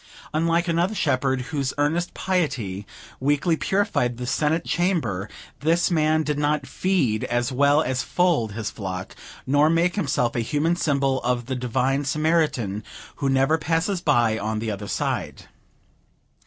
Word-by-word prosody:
Unlike 165 +2 +1
another 175 +5 +1
Shepherd, 130 -5 +1
whose 135 -3 -1
earnest 160 +4 0
piety 130 - -1 0.3
weekly 145 +5 +2
purified 175 - 0
the 125 - -4
Senate 150 +5 0
Chamber, 170 - 0 0.3
this 165 +6 +2
man 155 -1 +2
did 150 -1 -2
not 145 -1 +1
feed 130 - 0
as 120 0 -1
well 145 +4 +3
as 130 0 -1
fold 165 - +1
his 110 -1 -4
flock, 95 -3 -6 0.3
nor 145 +3 +4
make 170 +2 +2
himself 135 - 0
a - - +1
human 150 +8 +1
symbol 140 -5 +1
of 120 -1 -1
the 130 +2 -3
Divine 130 +3 0
Samaritan, 145 -8 0 0.3
who 140 - 0
never 135 +4 +3
passes 165 +4 0
by 120 -8 +2
on 110 +1 -2
the 110 0 -2
other 100 0 -5
side. - - -3
145 Hz, 145 wpm, -24 LUFS, 120-165 Hz, 0.3 s, nor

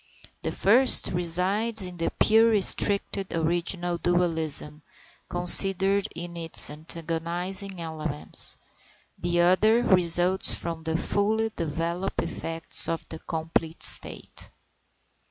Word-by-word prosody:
The - - -5
first 245 +6 +3
resides 185 +5 0
in 180 -1 -7
the 165 - -3
pure 225 +1 +1
restricted 200 -2 0
original 175 +1 -3
dualism, 160 -4 -3 0.5
considered 195 +2 +5
in 170 0 -9
its 165 -3 +2
antagonizing 170 +5 -6
elements; 155 -2 +3 0.6
the 175 0 -2
other 215 +7 +1
results 180 -1 +3
from 165 -1 -6
the 160 0 -3
fully 220 +5 -2
developed 170 +4 -5
effects 165 0 -3
of 165 - -6
the 160 - -10
complete 160 0 -5
state. - - +1
175 Hz, 100 wpm, -23 LUFS, 165-195 Hz, 0.6 s, considered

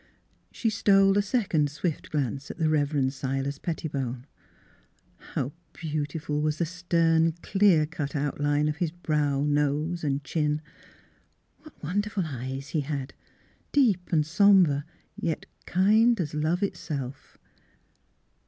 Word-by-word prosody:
She 225 - -1
stole 195 -2 +4
a 205 - +4
second 195 - +1
swift 150 +2 -3
glance 140 -2 -2
at - - -7
the 160 -1 +1
Rev. 145 -3 +1
Silas 135 +1 -3
Pettibone. 135 -7 -3 1.1
How 130 - -1 0.2
beautiful 150 -1 -3
was 150 0 0
the 170 - +1
stern, 165 -2 +2
clear 190 -6 +4
cut 150 -2 -5
outline 145 +1 +1
of 150 0 -2
his 170 0 0
brow, 150 -4 0
nose, 150 +3 0
and 140 -1 -1
chin! 150 0 0 1.0
What 310 - -17
won 180 +7 +1
derful 205 -3 -3
eyes 135 0 -5
he 155 - 0
had; 140 -2 -4 0.6
deep 215 -11 +2
and 155 -3 +3
somber 170 -4 +4 0.3
yet 165 -2 -3 0.2
kind 215 +5 +4
as 155 -4 -2
love 155 +5 0
itself. 140 -8 -5
155 Hz, 125 wpm, -27 LUFS, 145-180 Hz, 1.1 s, stole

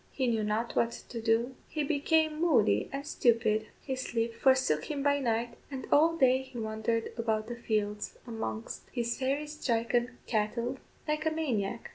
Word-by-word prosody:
He 265 - -1
knew 225 -3 +1
not 215 +3 -1
what 230 - +3 0.2
to 230 - -5
do; 225 +3 +2
he 305 - -2
became 310 +2 +2
moody 245 - +3
and 275 +1 -4
stupid; 225 -5 +2 0.2
his 260 -2 -3
sleep 230 -2 -1
forsook 260 - +3
him 285 -2 -3
by 285 0 +3
night, 235 -2 0 0.2
and 270 -2 -5
all 330 +3 +5
day 260 -3 +5
he 260 -1 -10
wandered 220 +1 -1
about 220 -2 0
the 240 +1 -5
fields, 210 -3 -2
amongst 225 -1 -4
his 235 -1 -2
"fairy 275 +3 0
stricken" 245 -4 0
cattle 235 +4 -1 0.3
like 305 +1 0
a - - +5
maniac. 260 -12 -2
240 Hz, 165 wpm, -30 LUFS, 225-280 Hz, 0.3 s, all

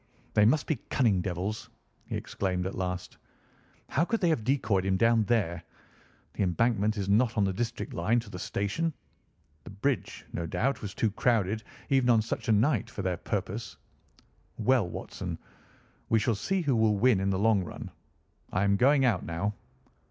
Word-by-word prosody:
"They 105 - +5
must 145 +7 +3
be 155 - 0
cunning 110 -9 +2
devils," 95 +4 -3 0.4
he - - -3
exclaimed 90 -2 -2
at 95 - -3
last. 90 -1 -4 0.7
"How 150 - +2
could 225 +6 0
they 175 - +2
have 155 -9 +1
decoyed 110 -7 +1
him 95 0 +1
down 115 0 +4
there? 95 -7 0 0.7
The - - -4
Embankment 105 +3 +1
is 100 -2 -2
not 115 +3 +2
on 105 - +4
the 95 -1 +1
direct 120 +3 -3
line 110 +8 +2
to 115 - -13
the 90 - -7
station. 125 - -1 0.7
The - - -10
bridge, 120 +8 -2
no 85 0 -3
doubt, 135 +11 0
was 105 -2 -6
too 110 - +1
crowded, 110 -1 +1 0.3
even 135 -3 +3
on 115 -2 +5
such 115 - -4
a - - +5
night, 110 +2 +2
for - - -6
their - - -1
purpose. - - -4 0.8
Well, 115 -4 +2
Watson, - - -6 0.7
we 115 - +4
shall 115 +1 +2
see 190 - -1
who 145 -6 +1
will 110 -2 +3
win 120 -2 +4
in 95 +1 0
the 95 - +1
long 105 -1 +3
run. - - -8 0.6
I 90 - +1
am 100 0 +3
going 135 +4 +4
out 110 -7 +2
now!" 85 +6 -2
110 Hz, 180 wpm, -29 LUFS, 95-120 Hz, 0.8 s, They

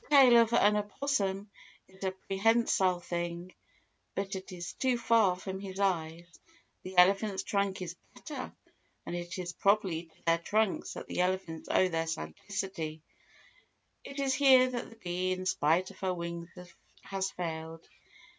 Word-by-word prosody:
The 300 - +4
tail 250 -4 +8
of 230 0 +1
an 210 -3 +5
opossum 205 -3 -1 0.4
is 190 +1 -14
a 190 - +2
prehensile 195 -1 +2
thing, 175 +1 -4 0.6
but 195 0 -2
it 190 0 -7
is 175 -1 -6
too 255 -2 +1
far 225 -5 +4
from 190 +1 -6
his 195 -1 -7
eyes—the 180 - -4
elephant's 195 +2 +4
trunk 200 -2 -1
is 170 0 -6 0.2
better, 285 -5 -7 0.5
and 175 - -4
it 175 0 -5
is 175 -1 -4
probably 195 -5 +1
to 160 - -28
their 165 0 +4
trunks 215 +4 0
that - - -6
the - - -1
elephants 180 -3 -2
owe 185 - +4
their 165 -2 -1
sagacity. 160 - -4 1.0
It 275 +1 -8
is 270 -1 +1
here 260 -2 +6
that 240 -1 -4
the 225 - -14
bee 185 -3 -2
in 185 0 -5
spite 180 +2 +2
of 195 - -17
her 185 -1 -1
wings 170 0 -5 0.5
has 195 0 -2
failed. 165 -2 -6
190 Hz, 155 wpm, -31 LUFS, 175-210 Hz, 1.0 s, tail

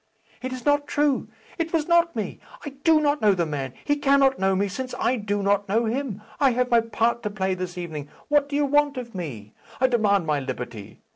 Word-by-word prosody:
"It 255 0 -4
is 255 -1 -7
not 290 0 +2
true. 290 -2 +1 0.3
It 330 0 -1
was 320 -3 0
not 340 -2 +3
me. 215 -4 -4 0.3
I - - -3
do 295 +3 +3
not 295 -1 +1
know 205 -2 +4
the 175 -2 0
man. 135 -4 -4
He 290 - +2
cannot 275 -1 +3
know 190 0 +2
me, 200 +2 +1
since 255 +6 -5
I 255 - +1
do 205 -3 -2
not 200 0 +1
know 225 +4 +2
him. 225 -3 -3 0.2
I 275 -4 +4
have 250 +1 0
my 235 -1 +6
part 230 +1 0
to 210 - -2
play 190 -2 -1
this 180 0 -5
evening. 155 -5 -6 0.2
What 290 -1 +2
do 285 - -3
you 290 0 +2
want 290 0 +2
of 240 -2 -6
me? 125 - -7 0.3
I 260 - +4
demand 210 -7 +2
my 150 -2 +1
liberty. 125 -6 -7
235 Hz, 225 wpm, -24 LUFS, 190-280 Hz, 0.3 s, my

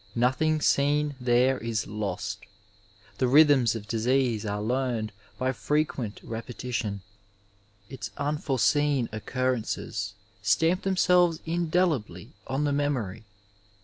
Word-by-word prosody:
Nothing 130 +6 +2
seen 145 +1 +2
there 125 +2 +3
is 115 -3 -2
lost; 100 -2 -4 0.8
the 130 - +3
rh3rthms 135 -4 +5
of 105 -2 -6
disease 115 0 +1
are 105 0 -2
learned 120 -1 -1 0.3
by 130 +1 0
frequent 135 -5 -1
repetition; 115 -3 -4 0.9
its 135 +2 -7
unforeseen 145 -2 +1
occurrences 110 -2 -2 0.3
stamp 165 - +2
themselves 180 -3 +3
indelibly 160 - 0 0.2
on 135 +2 -1
the 145 -1 +1
memory. 120 -8 -2
130 Hz, 100 wpm, -27 LUFS, 110-145 Hz, 0.9 s, rh3rthms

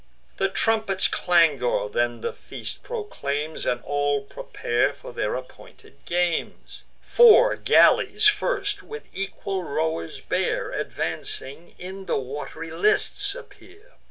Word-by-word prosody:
The 195 - +1
trumpet's 220 -2 +1
clangour 150 - +2
then 120 +2 -1
the - - -3
feast - - -7
proclaims, 155 - -4
And 120 0 -1
all 145 -1 0
prepare 120 -1 -1
for - - -11
their 105 - -1
appointed 130 0 -12
games. 175 -1 -2 0.2
Four 485 +1 +6
galleys - - +4
first, 420 0 +2
which 445 0 -9
equal 195 0 -4
rowers 155 - -2
bear, - - -1
Advancing, 140 +6 -4
in 190 +1 -8
the - - +1
wat'ry 145 +4 -6
lists 175 - +1
appear. 450 -1 -15
170 Hz, 115 wpm, -24 LUFS, 140-225 Hz, 0.2 s, Four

